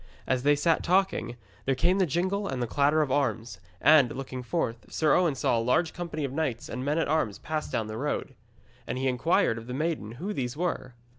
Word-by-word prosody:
As 130 -1 0
they 145 +2 +4
sat 160 +3 +2
talking, 185 -9 +1 0.3
there 135 - +2
came 175 +8 +2
the 185 - +3
jingle 190 +6 0
and 125 -3 -2
clatter 145 +5 +3
of 140 - -4
arms, 115 -7 -1 0.2
and, 145 -6 +6
looking 130 -1 -5
forth, 120 -6 -3
Sir 155 -1 +2
Owen 170 -6 +3
saw 120 -2 +1
a - - 0
large 160 +8 +1
company 165 -3 -4
of 135 - -5
knights 140 -6 -2
and 125 - -4
men 145 +3 0
at 165 - +1
arms 145 -10 0
pass 155 -1 -4
down 110 - -1
the 110 0 -6
road. 145 -1 -2 0.5
And 125 - -3
he 135 +1 0
inquired 130 - +2
of 115 - -12
the 125 - -4
maiden 150 -8 -2
who 185 - -4
these 125 -2 -3
were. 160 -7 -2
140 Hz, 215 wpm, -28 LUFS, 125-165 Hz, 0.5 s, and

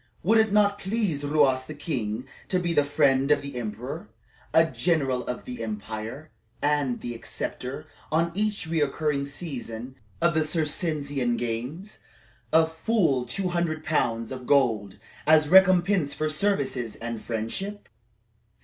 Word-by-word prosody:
"Would 220 +6 +5
it 220 -1 +3
not 205 -1 +3
please 190 -8 -1
Ruas 140 -3 +2
the 155 - -7
king 125 -6 -3 0.2
to 185 - +1
be 175 -2 0
the 145 - +4
friend 140 -1 +2
of 150 - +3
the 140 -2 -7
emperor, 120 +2 -5 0.4
a 160 - +6
general 145 -6 0
of 125 - -4
the 125 -2 -6
empire, 110 +6 -5 0.3
and 145 -4 +1
the 120 - -4
acceptor, 115 - -4 0.3
on 165 +2 +2
each 210 0 0
recurring 150 -2 0
season 130 -6 -5 0.3
of 170 0 +3
the 155 0 +2
Circensian 150 -5 0
games, 125 - -4 0.5
of 160 0 +4
full 160 - +2
two 180 +10 -1
hundred 170 -3 -1
pounds 115 -7 0
of 130 -1 -7
gold 115 -9 +2 0.3
as 155 -1 +5
recompense 185 -3 +5
for 155 0 -1
service 140 - 0
and 115 -1 -5
friendship?" 120 - -4
145 Hz, 140 wpm, -26 LUFS, 125-170 Hz, 0.5 s, a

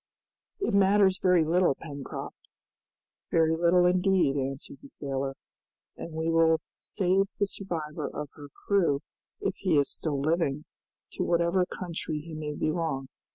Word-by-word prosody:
"It 395 - -1
matters 195 -1 +4
very 180 -3 +4
little, 170 -2 +3
Pencroft!" 140 -3 -7 0.9
"Very 160 -1 +3
little 175 +2 +4
indeed," 180 -5 +3
answered 135 0 -4
the 140 - -13
sailor, 135 -1 -3 0.6
"and 170 - -7
we 160 +1 -2
will 165 -1 +4 0.2
save 190 +1 +1
the 200 - +2
survivor 160 -6 -4
of 150 -1 -6
her 145 -1 -11 0.2
crew 170 -9 +2 0.4
if - - -1
he 180 -6 +2
is 140 -1 +3
still 150 -4 -2
living, 150 -1 0 0.5
to - - -2
whatever 170 +2 +2
country 170 -3 -4
he 160 +2 -9
may 150 -1 -4
belong. 155 -4 -1
165 Hz, 140 wpm, -28 LUFS, 145-180 Hz, 0.9 s, matters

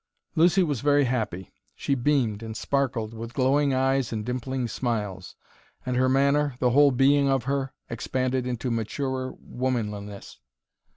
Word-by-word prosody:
Lucy 175 +4 +4
was 145 -8 -1
very 145 0 +4
happy. 110 -8 -2 0.2
She 140 - -1
beamed 125 -5 +1
and 110 0 -6
sparkled, 125 -6 -1
with 115 +2 -8
glowing 140 +2 +3
eyes 135 -1 +1
and 110 -2 -3
dimpling 125 +1 -2
smiles, 105 -7 -3 0.5
and 125 - -1
her 130 +1 +3
manner, 140 +1 +2
the 125 -1 +2
whole 145 +3 +6
being 140 +2 +3
of 135 -3 +1
her, 135 +1 -1 0.2
expanded 130 +2 -2
into 125 0 -2
maturer 130 +3 -2
womanliness. 105 -5 -4
130 Hz, 140 wpm, -26 LUFS, 115-140 Hz, 0.5 s, whole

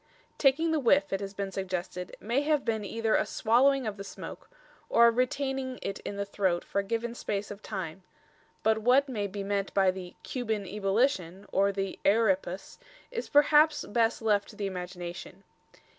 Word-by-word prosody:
Taking 310 +4 +3
the 315 - +2
whiff, 285 +2 +3
it 195 - 0
has 200 0 -6
been 195 0 -3
suggested, 180 -1 -4
may 240 +6 0
have 295 -1 +1
been 220 -2 0
either 225 +2 -1
a - - +3
swallowing 260 +4 +3
of 210 -2 -3
the 195 - -6
smoke, 200 - -9 0.4
or 235 - +6
a 235 - +7
retaining 260 +1 -1
it 195 - -3
in 200 - -6
the 200 0 -2
throat 190 -3 0
for - - -2
a - - 0
given 230 +3 -2
space 205 -3 -3
of 205 0 -8
time; 190 -3 -5 0.6
but 220 0 +3
what 255 +5 +4
may 210 -6 -2
be 200 +1 -5
meant 200 0 -1
by 190 -2 +4
the 185 -1 -9
"Cuban 220 -5 -2
ebolition" 195 -1 0
or 200 +1 +3
the 195 -1 -4
"euripus" 195 -3 +1 0.3
is 475 -1 -4
perhaps 295 +1 +5
best 225 +1 +1
left 205 -2 +2
to - - -12
the 205 - -3
imagination. 180 -1 -6
210 Hz, 180 wpm, -29 LUFS, 195-250 Hz, 0.6 s, a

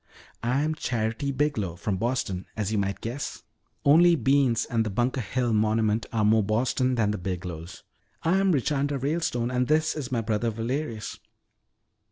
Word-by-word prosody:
I 125 +4 +1
am 155 +1 0
Charity 120 -1 -2
Biglow, 130 - -1
from 95 +1 -2
Boston 110 -5 -2
as 105 -1 -1
you 110 - +1
might 100 -1 -2
guess. 125 +5 -5 0.4
Only 170 +4 +7
beans 135 -5 +2
and 115 -2 0
the 110 - -2
Bunker 120 +5 0
Hill 120 +1 -1
Monument 110 +1 +1
are 110 -2 +1
more 110 +1 +5
Boston 125 +4 +1
than 110 -3 +2
the 105 - -3
Biglows." 90 -2 -6 0.4
"I'm 190 +3 +3
Richanda 145 -1 0
Ralestone 135 -4 -1
and 125 0 +1
this 155 0 +2
is 140 -5 -5
my 120 -3 +1
brother 115 +1 0
Valerius." 115 +1 -3
120 Hz, 160 wpm, -26 LUFS, 105-140 Hz, 0.4 s, Only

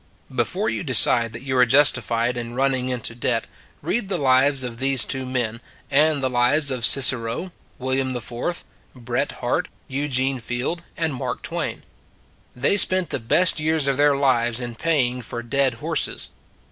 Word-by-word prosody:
Before 175 - -1
you - - -2
decide 120 - +2
that 115 +2 -8
you 130 -1 -3
are 125 - +6
justified 120 -3 +3
in 120 0 -6
running 130 -1 0
into 125 -2 -3
debt, 115 -1 -1 0.4
read 195 +6 -1
the 190 - 0
lives 135 -1 +3
of 120 -2 -7
these 135 -2 +5
two 130 -1 -2
men, 120 -3 -3 0.3
and 145 0 +2
the - - +2
lives 130 +4 +2
of 125 -2 -4
Cicero, 130 +5 +2 0.3
William 130 0 -1
IV, 125 +8 -5 0.3
Bret 120 -1 -3
Harte, - - -2 0.2
Eugene 135 -1 -1
Field 120 +9 -4 0.2
and 160 -3 -1
Mark 130 - -5
Twain. - - -4 0.7
They 140 +11 +1
spent 185 -3 +3
the - - -2
best 165 +9 +4
years 155 -1 +1
of 140 -1 0
their 145 0 +3
lives 120 -4 +1
in 120 -1 -5
paying 125 -3 0
for 120 +1 -7
dead 135 0 0
horses. 115 - -2
130 Hz, 160 wpm, -22 LUFS, 120-145 Hz, 0.7 s, are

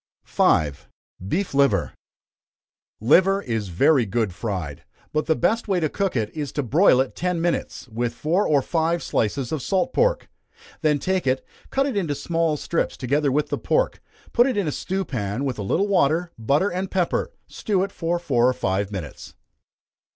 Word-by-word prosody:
5. 75 -3 +1 0.4
Beef 185 - -1
Liver. 135 - +2 1.1
Liver 190 - +4
is 115 -4 -2
very 120 - +3
good 110 -2 -1
fried, 90 -7 -4 0.3
but 155 0 0
the 160 - +3
best 225 +9 0
way 190 -3 +1
to 155 -3 0
cook 195 -1 -1
it, 110 -3 -1
is 150 -3 -3
to 145 - -1
broil 135 - +4
it 130 -1 0
ten 180 -1 -1
minutes, 170 -5 -2
with 120 0 -3
four 175 +7 +1
or 145 -3 +3
five 165 +2 0
slices 120 +3 -1
of 155 - -2
salt 195 - 0
pork. - - +1 0.5
Then 150 -3 +3
take 185 +1 -1
it, 130 +1 0 0.2
cut 270 0 +1
it 275 -5 -2
into 165 -8 -1
small 165 +1 0
strips 170 - -2
together 140 +2 +1
with 150 +3 0
the - - -2
pork, - - 0 0.3
put 240 +2 +5
it 255 - -1
in 200 -5 0
a - - 0
stew 190 +6 -3
pan, 110 +1 -3
with 125 -5 -3
a - - -2
little 170 - 0
water, 175 -2 +2
butter, 140 - +1
and 185 +1 -3
pepper. 185 - 0
Stew 195 -3 -1
it 200 - -3
four 170 0 -2
or 125 -2 +3
five 100 -2 -1
minutes. 90 -8 -7
150 Hz, 180 wpm, -23 LUFS, 120-185 Hz, 1.1 s, put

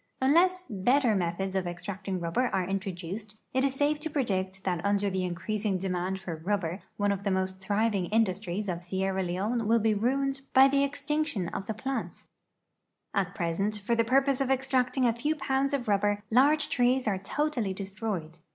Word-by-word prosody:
Unless 360 +7 +3
better 240 +4 +2
methods 185 +1 -1
of 185 -2 0
extracting 185 +2 -4
rubber 170 +9 0
are 190 -5 0
introduced, 195 +2 -4 0.2
it 260 0 +2
is 270 -1 +1
safe 295 +2 +1
to 320 +1 -3
predict 195 -9 -1
that 180 -3 -1
under 200 0 +1
the 185 0 -1
increasing 200 +3 -1
demand 185 0 -2
for 175 -4 -5
rubber 185 +1 -2 0.2
one 205 0 +2
of 200 0 -2
the 200 - 0
most 190 0 -1
thriving 205 -1 +1
industries 205 -2 0
of 175 -2 -2
Sierra 190 +1 -1
Leone 205 +6 -1
will 230 +1 +5
be 220 -1 +2
ruined 270 +5 0
by 265 +1 +9
the 275 0 +3
extinction 285 - -1
of 195 - -5
the 220 - -2
plant. 265 +5 -4 0.9
At 195 -1 0
present, 195 +3 -1
for 210 +4 -1
the 230 0 +3
purpose 270 +3 +2
of 265 - 0
extract 265 -1 +1
ing 260 - +3
a 235 - +3
few 295 +7 -1
pounds 270 -1 0
of 275 -5 -1
rubber, 205 0 +1
large 285 +6 +4
trees 250 0 +2
are 195 -3 +1
totally 240 0 -1
destroyed. 190 -4 -4
205 Hz, 180 wpm, -29 LUFS, 190-260 Hz, 0.9 s, by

